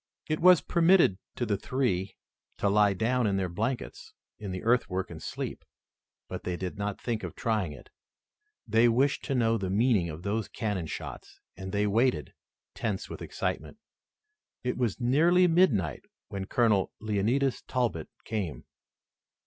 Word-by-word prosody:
It 155 0 -1
was 180 -1 +7
permitted 170 - +4 0.2
to 120 - -1
the 105 -3 0
three 100 -6 -1 0.4
to - - 0
lie 105 0 +4
down 115 +3 +1
in 100 -1 +1
their 95 -1 0
blankets 115 +9 -4 0.2
in 105 - -6
the 90 - -5
earthwork 95 -6 +1
and - - -8
sleep, - - -5 0.6
but - - -6
they 90 -1 -2
did 90 +1 -4
not 100 0 -3
think 115 -3 -2
of - - -6
trying 105 -8 0
it. 75 - -13 0.8
They 115 +2 +4
wished 135 +5 +2
to 135 - -1
know 115 -2 +2
the 95 -2 -2
meaning 105 -3 +2
of 80 +2 -8
those 105 +1 -1
cannon 100 -7 -3
shots - - -8 0.2
and 95 0 -7
they 105 +1 +1
waited, 115 +5 +1 0.4
tense - - -3
with - - -7
excitement. - - -4 0.9
It 125 - -1
was 120 -4 -1
nearly 165 +9 +4
midnight 130 - +2 0.2
when 100 -1 -4
Colonel 105 -3 +2
Leonidas 110 +6 0
Talbot 115 - -2 0.2
came. 100 -8 -4
110 Hz, 155 wpm, -29 LUFS, 95-125 Hz, 0.9 s, was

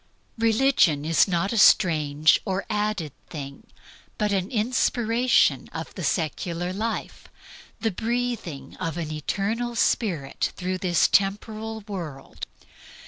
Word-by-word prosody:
Religion 225 - +3
is 165 +4 +4
not 190 +3 0
a 230 - +1
strange 155 -5 +5
or 190 0 -2
added 210 -7 -1 0.2
thing, 140 -3 -8 0.5
but 210 -1 0
the 190 -1 0
inspiration 240 +1 +2
of - - -6
the - - -6
secular 170 +2 -2
life, 220 +3 -4 0.5
the 225 - +1
breathing 220 - -3
of 165 -2 -3
an 160 -3 -4
eternal 215 +10 -2
spirit 170 - 0
through 185 +1 -2
this 175 -3 +3
temporal 215 +3 0
world. 160 -9 -7
195 Hz, 115 wpm, -25 LUFS, 165-225 Hz, 0.5 s, strange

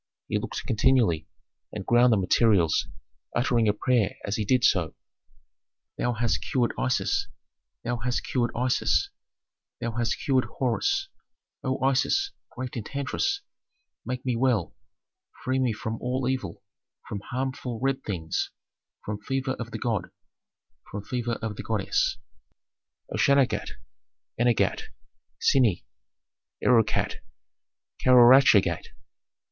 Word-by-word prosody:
He - - 0
looked - - -5
continually, 110 -8 +2 0.4
and 105 -3 -6
ground 120 +1 +5
the 110 - +4
materials, 95 -3 +3 0.5
uttering 120 -2 +2
a 105 - +4
prayer 115 -2 +1
as 100 - -1
he 110 - -1
did 125 +4 +2
so, 85 -5 +2 1.0
"Thou 120 - 0
hast 115 0 0
cured 125 -3 0
Isis, 130 -1 0 0.6
thou 120 0 -1
hast 120 +1 -2
cured 120 -2 0
Isis, 125 +1 +1 0.7
thou 115 - -2
hast 115 0 -1
cured 130 -2 +1
Horus 390 - 0 0.6
O 130 -1 -1
Isis, 135 - +2 0.2
great 125 0 -6
enchantress, 140 - -2 0.6
make 125 +1 -5
me 125 -2 0
well, 115 -7 +1 0.7
free 130 +1 0
me 130 -2 +2
from 110 +1 -5
all 125 +1 -1
evil, 130 -10 -3 0.4
from 100 - -4
harmful 130 -2 -4
red 135 +1 -1
things, 85 -6 -2 0.6
from 105 0 -4
fever 135 +4 -2
of 115 -2 -5
the 115 - -5
god, 110 -5 -2 0.8
from 105 -1 -6
fever 120 +1 -2
of 105 -3 -3
the - - -4
goddess 110 -3 0 0.9
Authentic. 140 -2 +3
"O - - +2
Shauagat, - - -9 0.7
eenagate, 120 -1 +1 0.5
synie! 120 - +3 0.8
Erukate! 115 -3 +3 0.9
Kauaruchagate! 120 -8 +6
120 Hz, 120 wpm, -26 LUFS, 110-130 Hz, 1.0 s, Kauaruchagate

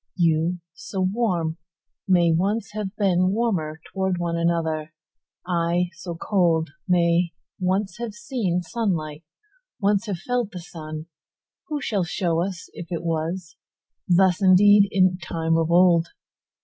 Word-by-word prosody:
You, 170 +1 +1
so 190 +2 -5
warm, 185 -5 0 0.5
may 175 -3 +4
once 200 +6 0
have 210 -2 -3
beenWarmer 185 -3 +1 0.2
towards 190 -1 0
another 170 -2 -1 0.5
one:I, 175 0 +1
so 170 0 -7
cold, 165 -4 +1 0.2
may 170 -1 +2 0.3
once 190 +2 -1
have 235 -1 -3
seenSunlight, 190 - -2 0.6
once 205 +1 +1
have 200 -4 -2
felt 240 +2 -2
the 180 - -5
sun:Who 160 - -9
shall 200 -8 0
show 170 -2 0
us 185 -1 -4
if 170 - -8
it 170 -2 -3
wasThus 175 +2 -1
indeed 200 +2 +6
in 185 -1 +3
time 165 -2 -1
of 165 0 +1
old? 170 -1 +5
180 Hz, 115 wpm, -24 LUFS, 170-195 Hz, 0.6 s, indeed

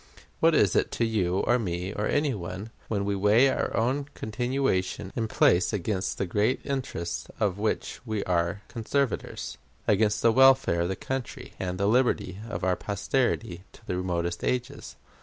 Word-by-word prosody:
What - - +4
is - - +4
it - - +2
to 115 - +1
you, 95 -5 +1
or 120 +1 +2
me, 90 -2 -3
or 105 - -1
any 145 -2 +1
one, 95 +2 -6 0.2
when 100 -3 -1
we 100 0 0
weigh 105 +7 +5
our - - -1
own 130 +5 +1
continuation 115 -5 -1
in 115 -1 -1
place 95 -1 +3
against 95 -1 -1
the 100 - -1
great 105 +7 +1
interests 85 - -3
of 100 -3 0
which 110 +1 -2
we 110 -4 -2
are 90 +3 0
conservators; 115 - -2 0.3
against 105 0 +2
the 115 - +6
welfare 135 -8 +5
of 85 - 0
the 95 - -1
country, 130 +2 -5
and 90 -1 -3
the 100 - 0
liberty 105 -5 +1
of 105 - -4
our 90 -1 +2
posterity 100 -3 -1
to - - -18
the 90 - -2
remotest 85 -1 -2
ages? 125 +3 -3
105 Hz, 170 wpm, -27 LUFS, 90-120 Hz, 0.3 s, the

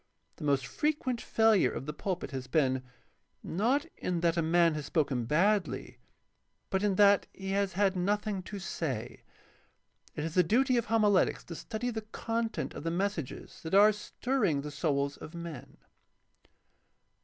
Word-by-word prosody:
The - - -9
most 140 -3 +1
fre 215 - -1
quent 265 -6 -1
failure 220 -3 +3
of - - -5
the 150 - -4
pulpit 180 -2 -3
has 130 -2 -5
been, 130 -2 +2 0.6
not 240 - +1
in 175 -2 -2
that 170 -1 +2
a 170 - +1
man 165 +1 +3
has 150 -2 -4
spoken 135 -7 0
badly, 190 - +1 0.7
but 190 -1 +1
in 205 -2 +1
that 200 0 +5
he 190 0 -5
has 200 -1 0
had 195 +1 +2
nothing 205 +2 0
to 200 +3 -7
say. 135 - -4 0.9
It 150 - -3
is 160 0 -3
the 180 - +5
duty 250 +9 +3
of 235 -2 +1
homiletics 210 -4 +3
to 170 - -8
study 230 +7 -4
the 220 -1 -4
content 225 +1 -3
of - - -7
the 165 - -1
messages 175 -4 -3
that 160 +3 -2
are 210 +2 +8
stirring 210 - -1
the 150 +1 -6
souls 140 -2 -1
of 160 - -10
men. 155 -6 -8
185 Hz, 165 wpm, -30 LUFS, 155-210 Hz, 0.9 s, are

